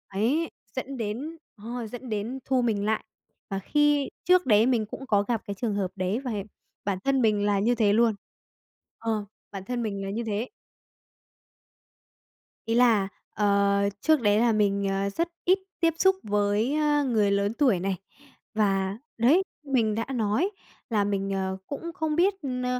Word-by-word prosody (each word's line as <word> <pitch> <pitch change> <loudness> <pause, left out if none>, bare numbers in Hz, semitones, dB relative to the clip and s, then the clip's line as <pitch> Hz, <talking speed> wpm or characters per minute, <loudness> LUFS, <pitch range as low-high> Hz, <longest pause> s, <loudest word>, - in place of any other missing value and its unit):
đấy, 280 +11 +1 0.2
dẫn 265 +1 -4
đến 245 +9 -4 0.2
ờ, 230 +2 -5
dẫn 245 +2 -8
đến 220 +5 -3
thu 260 -1 +2
mình 215 -4 0
lại. 220 0 0 0.5
Và 195 0 -2
khi 295 +4 +2 0.2
trước 360 0 +5
đấy 220 -2 +5
mình 240 -4 +2
cũng 265 +5 -8
có 205 -4 +3
gặp 225 +1 -1
cái 200 - -2
trường 215 0 -2
hợp 190 -2 -1
đấy 190 +4 -1
và 260 -3 -4 0.5
bản 200 -2 0
thân 270 -1 +3
mình 210 -2 +2
là 205 -1 +2
như 235 +4 +2
thế 210 -3 +3
luôn 225 -1 +3 0.8
ờ, 220 -2 -1 0.3
bản 195 -1 -7
thân 245 -1 -2
mình 200 -3 -3
là 195 - -4
như 230 +4 -2
thế. 220 +3 -2 2.2
Ý 225 - 0
là, 230 -5 +4 0.3
ờ, 200 -1 +3 0.3
trước 315 -2 +3
đấy 205 -2 +3
là 235 -1 +4
mình, 200 -2 +1
ờ, 195 +1 0
rất 335 +12 -1 0.2
ít 370 +2 +4 0.2
tiếp 330 -2 +3
xúc 380 +1 +4
với, 205 +5 +1
á, 295 -1 +2
người 220 -7 +2
lớn 200 +1 +1
tuổi 245 -11 +3
này, 190 0 -1 0.6
và, 195 -1 +1 0.2
đấy, 280 +11 +5 0.2
mình 240 -6 +1
đã 225 +1 -1
nói 235 - +1 0.4
là 210 -2 +2
mình, 195 -1 -1
ờ, 190 0 -2
cũng 335 +4 -5
không 315 -3 -2
biết 375 +4 +4
n 250 -1 -2
220 Hz, 175 wpm, -27 LUFS, 205-265 Hz, 2.2 s, trước